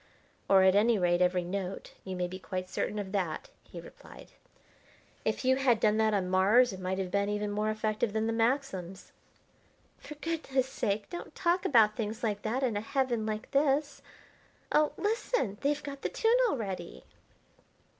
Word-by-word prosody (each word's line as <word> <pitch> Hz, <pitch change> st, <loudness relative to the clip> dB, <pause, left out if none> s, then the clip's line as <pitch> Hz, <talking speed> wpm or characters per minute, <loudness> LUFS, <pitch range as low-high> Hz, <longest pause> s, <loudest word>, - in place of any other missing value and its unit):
"Or, 190 Hz, -1 st, +6 dB
at 190 Hz, 0 st, +6 dB
any 220 Hz, +3 st, +4 dB
rate, 175 Hz, -1 st, +2 dB
every 180 Hz, 0 st, +2 dB
note. 190 Hz, +1 st, -5 dB
You 190 Hz, -1 st, -5 dB
may 180 Hz, 0 st, -1 dB
be 185 Hz, +1 st, -8 dB
quite 185 Hz, -1 st, -5 dB
certain 210 Hz, -, -3 dB
of 200 Hz, -2 st, -4 dB
that," 185 Hz, -6 st, -3 dB
he -, -, -10 dB
replied. -, -, -14 dB, 0.9 s
"If -, -, -2 dB
you 260 Hz, 0 st, +4 dB
had 255 Hz, -4 st, +3 dB
done 215 Hz, 0 st, +3 dB
that 220 Hz, 0 st, +3 dB
on 195 Hz, -3 st, 0 dB
Mars 200 Hz, +6 st, +4 dB
it 190 Hz, -, -8 dB
might 185 Hz, 0 st, -2 dB
have 190 Hz, -2 st, -3 dB
been 200 Hz, +1 st, +1 dB
even 210 Hz, 0 st, -2 dB
more 210 Hz, +1 st, -1 dB
effective 215 Hz, 0 st, -1 dB
than 220 Hz, +1 st, -1 dB
the 225 Hz, -, 0 dB
Maxims." 225 Hz, -6 st, -1 dB, 0.9 s
"For 300 Hz, -, -10 dB
goodness 295 Hz, -5 st, -1 dB
sake 210 Hz, -5 st, -2 dB
don't 345 Hz, -, -7 dB
talk 350 Hz, 0 st, +1 dB
about 220 Hz, -5 st, +5 dB
things 220 Hz, +1 st, -4 dB
like 205 Hz, -2 st, -1 dB
that 240 Hz, +6 st, -2 dB
in 240 Hz, -5 st, 0 dB
a 205 Hz, -, -1 dB
heaven 240 Hz, -2 st, -1 dB
like 215 Hz, 0 st, -4 dB
this! 285 Hz, +1 st, +1 dB, 0.7 s
Oh, 300 Hz, 0 st, +3 dB
listen! 415 Hz, -, -1 dB
They've 295 Hz, +1 st, 0 dB
got 280 Hz, -1 st, -7 dB
the -, -, -2 dB
tune 455 Hz, +1 st, +2 dB
already!" 195 Hz, -, -5 dB
215 Hz, 175 wpm, -30 LUFS, 190-260 Hz, 0.9 s, Or